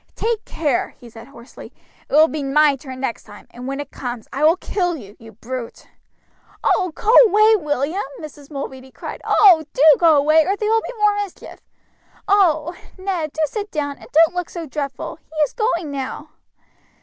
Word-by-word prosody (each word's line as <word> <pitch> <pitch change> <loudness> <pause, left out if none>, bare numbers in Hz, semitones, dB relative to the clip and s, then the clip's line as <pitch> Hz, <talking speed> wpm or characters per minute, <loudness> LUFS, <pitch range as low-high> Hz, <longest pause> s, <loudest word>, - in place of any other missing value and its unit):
"Take 450 -1 -2
care!" 290 -6 -2
he 240 -2 -14
said 225 +1 -12
hoarsely, 255 -3 -13 0.4
"it - - -11
will 310 +1 +7
be 310 -2 -4
my 285 +1 +3
turn 260 -1 -10
next 245 -4 -3
time, 205 -1 -14
and 250 +1 -9
when 275 +1 -4
it 290 - -7
comes 245 -3 -6
I 280 - -2
will 320 +3 +5
kill 355 -3 -2
you, 205 -5 -13
you 225 0 -13
brute." 235 +2 -8 0.8
"Oh, 365 -2 +1
go 440 +2 +1
away, 430 +2 +5
William!" 295 +6 -1 0.2
Mrs. 295 -2 -11
Mulready 265 -2 -7
cried; - - -9
"oh! 360 -6 +5
do 275 - +1 0.2
go 330 -3 +5
away, 305 +3 +4
or 390 +5 0
there 425 +1 -2
will 450 0 +3
be - - -7
more 420 -1 +3
mischief. 405 -3 -7 0.7
Oh! 345 -5 +2 0.2
Ned, 370 -5 -3
do 315 - -4
sit 415 +6 -5
down, 285 -4 -4
and - - -15
don't 325 +2 +5
look 355 -1 -3
so 340 -2 -6
dreadful; 280 -2 -5
he 320 -1 -21
is 295 - +1
going 355 -10 -1
now." 280 +2 -6
305 Hz, 185 wpm, -20 LUFS, 270-360 Hz, 0.8 s, will